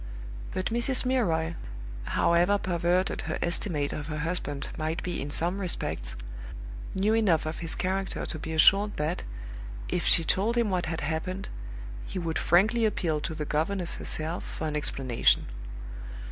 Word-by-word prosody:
But 185 +4 -1
Mrs. 250 +2 +2
Milroy, 170 -11 +2 0.5
however 175 +4 +4
perverted 180 0 +1
her - - -2
estimate 170 -4 +1
of 150 -1 -4
her 155 -1 -3
husband 150 -3 -1
might 160 +1 -2
be 175 -1 -2
in 140 - -3
some 175 +6 +1
respects, - - -2 0.8
knew 200 +3 +3
enough 195 -9 +3
of 155 +1 -3
his 165 -1 -2
character 190 +1 -1
to 155 - -3
be 160 - -5
assured 195 +6 +6
that, 155 +4 -1 0.7
if - - 0
she 165 - +6
told 210 +8 +2
him 230 -4 +3
what 180 -3 0
had 165 0 -2
happened, 165 +5 -2 0.6
he - - -5
would 165 -3 -1
frankly 215 +7 +4
appeal 170 -7 +1
to 160 +2 -3
the 150 - -2
governess 170 +5 0
herself 160 +2 -3
for - - -5
an 150 -1 -1
explanation. 135 -5 +2
170 Hz, 155 wpm, -29 LUFS, 155-195 Hz, 0.8 s, assured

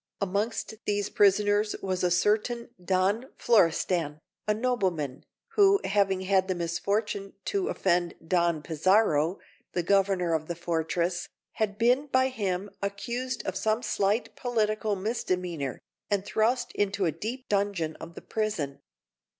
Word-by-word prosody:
Amongst 205 +4 -1
these 205 0 0
prisoners 205 +1 +3
was 185 -1 -2
a 180 - +3
certain 220 +6 +1
Don 195 +7 +1
Florestan, 170 -7 +2 0.3
a 210 - +4
nobleman, 190 - -1 0.3
who, 400 -3 +5
having 195 -2 +2
had 190 0 +2
the 185 - 0
misfortune 195 +4 -2
to 395 -1 0
offend 175 - +1
Don 170 -3 +2
Pizarro, 165 0 +2 0.4
the 175 - 0
governor 190 -2 +2
of 155 -1 -1
the 170 - -3
fortress, 170 +1 -1 0.2
had 210 -2 -2
been 250 +5 +3
by 260 -1 +3
him 200 -5 -2
accused 235 +5 -3
of - - -2
some 220 +2 0
slight 205 +4 0
political 215 -3 0
misdemeanour, 180 - -2 0.3
and 200 -1 0
thrust 240 +4 +1
into 200 -1 0
a 165 - +2
deep 225 - -6
dungeon 195 -6 0
of 170 +1 -10
the - - -9
prison. 205 -11 -2
200 Hz, 135 wpm, -28 LUFS, 175-220 Hz, 0.4 s, who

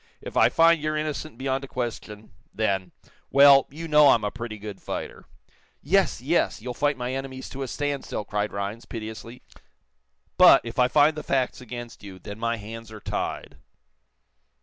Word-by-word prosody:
If - - -9
I - - +5
find 165 -1 +4
you're 155 0 -1
innocent 155 -3 -4
beyond 135 +1 -2
a - - -7
question 110 -4 -6 0.2
then 95 -4 -1 0.4
well, 140 0 +7
you 165 +4 -7
know 150 -2 +6
I'm 115 - +4
a 105 - -1
pretty 115 -2 -7
good 105 -1 -9
fighter." - - -6 0.5
"Yes, - - +1
yes; - - 0
you'll 125 +2 -6
fight 145 +2 0
my 125 +1 -3
enemies 130 -1 -6
to 135 - -7
a 135 - -3
standstill," 140 -5 -3
cried 105 0 -2
Rhinds, 100 +3 -5
piteously. 115 +2 -8 1.0
"But, - - +8
if 115 +3 -6
I 125 - +5
find 150 +4 +4
the 155 - -5
facts 130 -3 -1
against 120 -1 -9
you, 95 -2 -10
then 100 +3 -9
my 115 0 -1
hands 110 +1 -9
are 110 - -9
tied." - - -4
125 Hz, 170 wpm, -25 LUFS, 110-140 Hz, 1.0 s, But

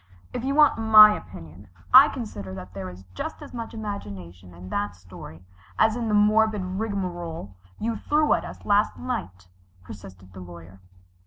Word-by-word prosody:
"If - - -4
you 275 +1 -1
want 300 -5 +4
my 215 -1 +8
opinion, 85 +5 -12 0.3
I 265 +3 +10
consider 105 - -7
that 90 0 -10
there 95 -1 -6
is 90 +1 -13
just - - -6
as - - -12
much 230 -1 -7
imagination 95 - -8
in 90 +2 -12
that 100 -1 -3
story 90 -2 -13 0.3
as 220 0 +3
in 235 -2 -3
the 210 - +1
morbid 210 0 +3
rigmarole 180 - -5 0.2
you 230 +1 -3
threw 300 +6 +1
at - - -1
us - - -10
last 205 +1 +2
night," 95 - -6 0.4
persisted 95 -1 -13
the 95 - -11
Lawyer. 90 +1 -12
165 Hz, 165 wpm, -24 LUFS, -, 0.4 s, I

